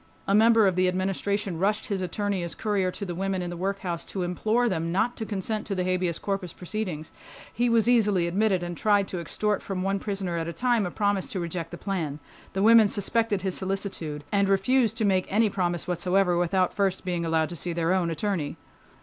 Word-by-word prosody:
A 195 - +2
member 225 +1 +6
of 190 -2 +2
the 185 0 +3
Administration 190 0 -1
rushed 205 +3 +1
his 195 -2 -2
attorney 200 +1 -1
as 170 -1 -5
courier 200 -4 0
to 200 +2 -5
the 175 - -4
women 190 +1 -2
in 175 - -4
the - - -5
workhouse 185 -1 -3
to 190 - -3
implore 215 +7 +1
them 165 -5 -1
not 225 +7 +1
to 220 - -4
consent 210 +1 -3
to 200 - -2
the 185 - 0
habeas 180 -2 0
corpus 195 -4 -3
proceedings. 180 -5 -5 0.4
He 240 +1 +1
was 230 -1 +3
easily 210 -7 +3
admitted 190 +1 +1
and 175 0 -4
tried 205 +1 +2
to 180 - -3
extort 210 +5 -1
from 185 -2 -3
one 195 +1 0
prisoner 195 -4 -3
at 165 - -3
a 170 - -4
time 235 +1 +1
a - - -3
promise 205 -1 0
to 220 -8 -4
reject 170 -1 -4
the 175 - -8
plan. 170 -8 -3 0.4
The 195 - 0
women 225 -1 +7
suspected 205 -1 0
his 190 -2 -1
solicitude 190 -6 -3
and 200 -1 +2
refused 225 +3 +2
to 220 - +1
make 190 -2 +2
any 215 +1 +3
promise 175 -3 -1
whatsoever 180 +1 +2
without 180 +1 +1
first 195 -2 0
being 175 -2 -1
allowed 160 -1 +1
to 175 - -6
see 175 +3 -3
their 170 +1 +1
own 180 -3 +1
attorney. 165 -3 -2
190 Hz, 215 wpm, -26 LUFS, 175-205 Hz, 0.4 s, women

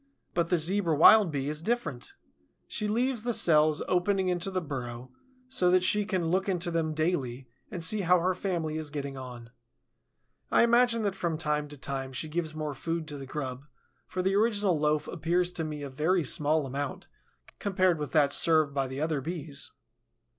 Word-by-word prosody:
But 170 -1 0
the 180 - +3
Zebra 170 0 +1
Wild 200 +4 +7
Bee 140 -2 -2
is 150 +1 -2
different. 240 - -3 0.5
She 210 - -2
leaves 240 +2 0
the 240 0 -1
cells 155 -2 +3
opening 185 +1 +1
into 180 +1 -1
the 185 -1 -1
burrow, 125 -5 -6 0.4
so 255 -9 +1
that 185 0 +4
she 210 +2 +2
can 180 -5 -1
look 190 +2 +1
into 175 -2 +1
them 160 -2 -1
daily 135 -6 -1 0.2
and 175 - -5
see 205 +5 +2
how 180 0 +4
her 185 +2 +1
family 170 -4 -2
is 155 -2 -4
getting 140 -2 -5
on. 125 -3 -9 1.0
I - - +5
imagine 235 -1 +3
that 200 -2 0
from 170 -4 -2
time 150 -1 -1
to 145 0 -11
time 135 -1 -4
she 155 - -3
gives 155 0 -3
more 155 -2 -3
food 165 +2 -4
to 145 - -6
the 135 - -8
grub, 135 -1 -5 0.4
for 185 - -3
the 190 +1 +1
original 205 -5 +2
loaf 150 0 +1
appears 175 +1 0
to 175 -2 -3
me 150 -2 -5
a 140 - -5
very 160 +6 +1
small 150 +2 +1
amount 140 +1 -5 0.5
compared 185 -4 +1
with 145 -4 -4
that 145 -3 +3
served 155 -3 +3
by 135 -1 0
the 130 +1 -6
other 155 -2 -1
Bees. 155 -2 -6
160 Hz, 190 wpm, -29 LUFS, 145-185 Hz, 1.0 s, Wild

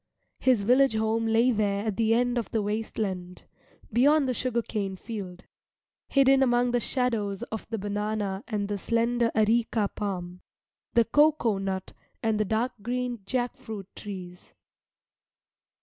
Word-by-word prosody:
His 250 -6 +3
village 255 +2 +4
home 220 +1 +1
lay 230 +3 +4
there 205 -2 0
at 215 -3 -1
the 225 +1 +3
end 245 0 +1
of 230 - -5
the 220 -2 0
waste 215 +2 -3
land, 180 -4 -4 0.5
beyond 280 +4 +4
the 255 - +1
sugar 240 -1 -1
cane 195 -3 -3
field, 190 -3 -7 0.6
hidden 270 -1 +4
among 245 -1 +3
the 245 - +2
shadows 225 -6 -1
of 220 - -5
the 225 - -2
banana 205 0 -2
and 210 -3 -2
the 205 -1 -3
slender 235 +2 +1
areca 220 -1 +2
palm, 180 -3 -4 0.5
the 235 -1 +5
cocoa 285 -6 +3
nut 190 -1 -3 0.3
and 220 -1 +1
the 215 - +2
dark 225 +5 0
green 245 +1 -2
jack 245 -1 -1
fruit 205 -4 -8
trees. 180 -3 -9
220 Hz, 150 wpm, -27 LUFS, 200-245 Hz, 0.6 s, the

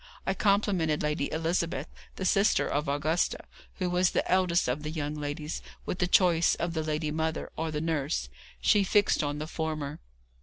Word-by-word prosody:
I 190 - +1
complimented 195 -7 +1
Lady 150 -1 -1
Elizabeth, 165 -2 -1 0.3
the 190 - -4
sister 195 +3 +3
of 145 0 -1
Augustus, 155 +4 0 0.3
who 185 - -1
was 180 0 +3
the - - 0
eldest 180 -2 +2
of 125 +4 -1
the 150 - -4
young 150 -2 -3
ladies, 150 +1 -4 0.2
with 180 - -3
the 180 - +2
choice 175 -2 +4
of 170 -1 -2
the 160 - -1
lady 155 0 -2
mother, 160 +1 -2
or 160 0 -2
the 150 -1 -2
nurse. 155 - -1 0.3
She 200 - +4
fixed 205 0 +3
on 145 -1 -2
the 150 - -4
former. 155 -2 -4
160 Hz, 180 wpm, -29 LUFS, 150-180 Hz, 0.3 s, choice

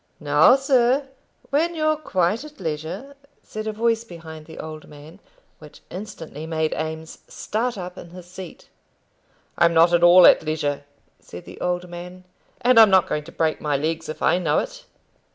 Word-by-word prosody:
"Now, 150 - +5
sir, 270 0 +2 0.4
when 330 +5 +1
you're 310 -1 +1
quite 205 - -1
at 300 -4 -13
leisure," 165 - -5 0.3
said 215 0 -7
a - - -1
voice 225 +1 0
behind 160 -6 -11
the 160 - -12
old 155 -1 -8
man, 150 +5 -14 0.4
which 150 -1 -15
instantly 165 -5 -8
made 160 -1 -1
Eames 160 +1 -6
start 235 +2 -3
up 180 -1 -7
in - - -11
his 180 0 -12
seat. 180 0 -11 0.9
"I'm 170 0 +4
not 165 +2 +5
at 175 - +4
all 175 +1 +8
at - - +7
leisure," 145 -2 -3 0.3
said 90 - -12
the - - -12
old 180 0 -2
man; 180 +1 -10 0.4
"and 250 -1 +5
I'm 220 -2 +8
not 190 -2 +4
going 150 0 -3
to 170 - -11
break 160 -1 -1
my 145 -2 0
legs 160 +2 -3
if 155 0 -6
I 175 - +3
know 160 -5 +1
it." - - -4
175 Hz, 175 wpm, -22 LUFS, 160-220 Hz, 0.9 s, all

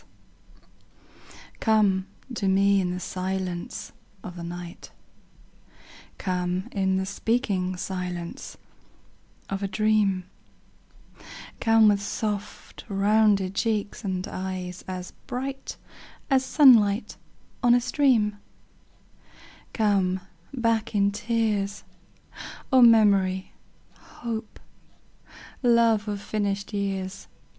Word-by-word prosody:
ECHO. - - -27 0.2
Come 200 -4 +2 0.3
to 205 -4 -2
me 195 +1 +4
in 180 - -1
the 180 0 -3
silence 185 -1 -4 0.3
of 180 - -8
the 175 - -7
night; 175 +2 -8 1.3
Come 180 0 -2
in 190 -2 +1
the 190 0 0
speaking 195 -3 -1
silence 180 -2 -5 0.9
of 195 0 -4
a 200 - -1
dream; 200 -1 +1 1.4
Come 225 -1 +5
with 205 -1 +3
soft 205 0 -5
rounded 200 -1 +3
cheeks 210 -1 -1
and 185 -2 -3
eyes 185 -1 -5
as 185 -1 -6 0.2
bright 270 +2 -5 0.5
As 265 -1 +4
sunlight 240 -7 +5 0.5
on 240 -1 +5
a - - +4
stream; 240 -5 +2 1.3
Come 195 -4 +1 0.3
back 230 -3 0
in 200 0 +3
tears, 210 -2 -1 0.9
O 260 - +7
memory, 200 -5 +4 0.5
hope, 225 -2 -7 1.0
love 230 -3 +3
of 205 -1 -3
finished 200 0 -3
years. 195 -2 -3
200 Hz, 95 wpm, -26 LUFS, 190-220 Hz, 1.4 s, O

